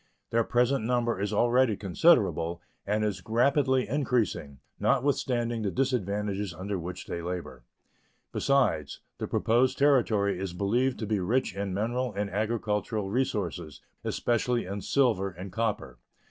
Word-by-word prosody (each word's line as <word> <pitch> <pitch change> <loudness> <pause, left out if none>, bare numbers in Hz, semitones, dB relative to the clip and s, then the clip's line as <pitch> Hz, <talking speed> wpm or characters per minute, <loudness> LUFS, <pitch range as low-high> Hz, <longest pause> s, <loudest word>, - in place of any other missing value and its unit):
Their 115 0 +3
present 125 +2 +1
number 120 -3 0
is 100 - -1
already 120 -3 +3
considerable, 90 - +2 0.3
and 105 +1 +1
is 105 -3 -2
rapidly 130 +3 +2
increasing, 115 - -1 0.2
notwithstanding 120 -4 +1
the 105 - 0
disadvantages 105 -6 -1
under 95 0 -3
which 90 +2 -6
they 85 - -4
labor. 85 -8 -6 0.7
Besides, 115 - +1 0.2
the - - -3
proposed 120 +3 +2
Territory 115 -9 +3
is 95 -2 -4
believed 120 +8 +1
to 110 - -4
be 105 -1 0
rich 105 +3 0
in 100 -2 -3
mineral 120 +3 -1
and 100 0 -2
agricultural 105 -1 -1
resources, 100 - -2 0.2
especially 120 0 0
in 100 +2 -5
silver 115 -8 +2
and 90 +1 -9
copper. 105 - -2
110 Hz, 130 wpm, -28 LUFS, 95-125 Hz, 0.7 s, Their